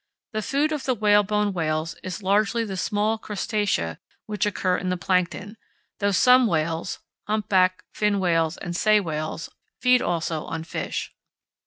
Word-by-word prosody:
The 215 - -1
food 285 +7 0
of 300 -3 -3
the 260 -2 +1
whalebone 210 -1 +3
whales 160 -1 -1
is 185 +1 -6
largely 210 +4 +2
the 195 -3 -5
small 210 +4 0
crustacea 205 - -1 0.3
which 210 -1 -1
occur 185 -3 0
in 185 - -2
the 180 - 0
plankton, 185 +4 -1 0.4
though 200 - +2
some 250 +5 +5
whales 165 -1 -1 0.3
(humpback, 190 -3 +2
fin 210 -1 +1
whales, 165 -3 +1
and 175 0 -5
sei 215 +3 +4
whales) 160 -3 -4 0.3
feed 250 0 +4
also 165 -2 -1
on 165 -1 -4
fish. 165 - -4
195 Hz, 150 wpm, -24 LUFS, 170-215 Hz, 0.4 s, some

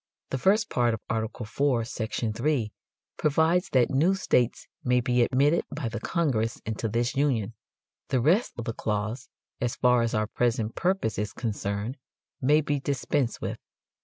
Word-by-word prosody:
The 130 - -1
first 210 - +3
part 120 -2 +2
of 110 - -11
Art. 110 -1 0
IV, 120 +1 0
section 110 -1 -2
3, 120 -2 0 0.5
provides 160 +4 +2
that 125 -3 +3
"new 160 +8 +3
states 125 -10 +1 0.2
may 125 -2 +3
be 125 0 +2
admitted 140 +7 +3
by 140 -5 -3
the 115 - -4
Congress 130 -10 0
into 110 0 -2
this 120 +3 0
Union," 125 -7 +1 0.5
the 130 - +1
rest 170 - +3
of 120 - -4
the 115 - -2
clause, 110 +3 -3 0.3
as 120 -1 0
far 125 -1 +4
as 115 -1 0
our 110 0 +2
present 115 0 0
purpose 180 - 0
is 105 -2 -2
concerned, 105 +2 -3 0.4
may 150 +4 +4
be 145 -1 -1
dispensed 135 -1 -1
with. - - -4
125 Hz, 160 wpm, -27 LUFS, 115-145 Hz, 0.5 s, far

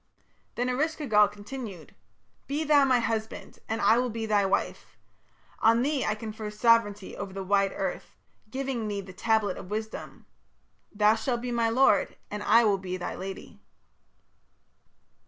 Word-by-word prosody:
Then 245 +1 -1
Eresh 300 +6 0
ki 300 - -5
gal 210 -4 +5
continued: 205 -3 -9 0.5
"Be 290 +3 -1
thou 290 -2 +5
my 260 -2 +4
husband 225 -1 -4
and 225 +1 -1
I 230 - +4
will 250 0 0
be 225 0 -4
thy 205 -2 +2
wife. 195 +1 -2 0.6
On 230 +2 +4
thee 285 0 0
I 215 - 0
confer 215 -1 -6
sovereignty 210 -2 +2
over 200 -1 -6
the 195 0 -5
wide 195 0 +2
earth, - - -4 0.3
giving 260 -2 -3
thee 205 -1 -3
the 190 -1 -11
tablet 220 -1 +1
of 180 - -9
wisdom. 220 +1 -6 0.7
Thou 210 +1 +4
shalt 235 +1 -2
be 245 0 -4
my 230 -1 +1
lord 255 +4 +3
and 210 0 -4
I 225 +3 +5
will 205 -3 +2
be 185 -1 -4
thy 175 - -4
lady." 190 +1 -8
220 Hz, 160 wpm, -27 LUFS, 205-245 Hz, 0.7 s, gal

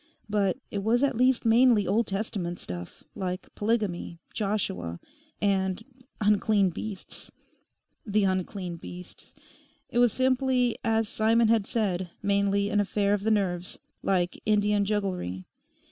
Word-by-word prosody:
But 205 -1 +1
it 200 - -2
was 235 +5 +2
at 275 -2 +2
least 255 +1 +3
mainly 230 -2 +5
Old 215 +5 +1
Testament 195 -3 -3
stuff, 90 0 -8
like 185 -2 -5
polygamy, 205 -6 -1 0.2
Joshua, 95 - -2 0.4
and 190 -2 +1
the 225 - -14 0.4
'unclean 205 -2 +3
beasts.' 200 +3 -7 0.7
The 210 -1 +1
'unclean 185 -2 -2
beasts.' 180 +2 -11 0.6
It 240 - +1
was 245 -2 +5
simply, 255 -1 +2
as 225 -1 +1
Simon 225 +2 +3
had 225 -3 +3
said, 190 -5 -1
mainly 200 0 +2
an 205 - +2
affair 205 0 +1
of 205 - 0
the 220 - 0
nerves, 185 -4 0 0.2
like 180 -2 0
Indian 210 -1 +2
jugglery. 185 - -2
205 Hz, 130 wpm, -27 LUFS, 185-220 Hz, 0.7 s, mainly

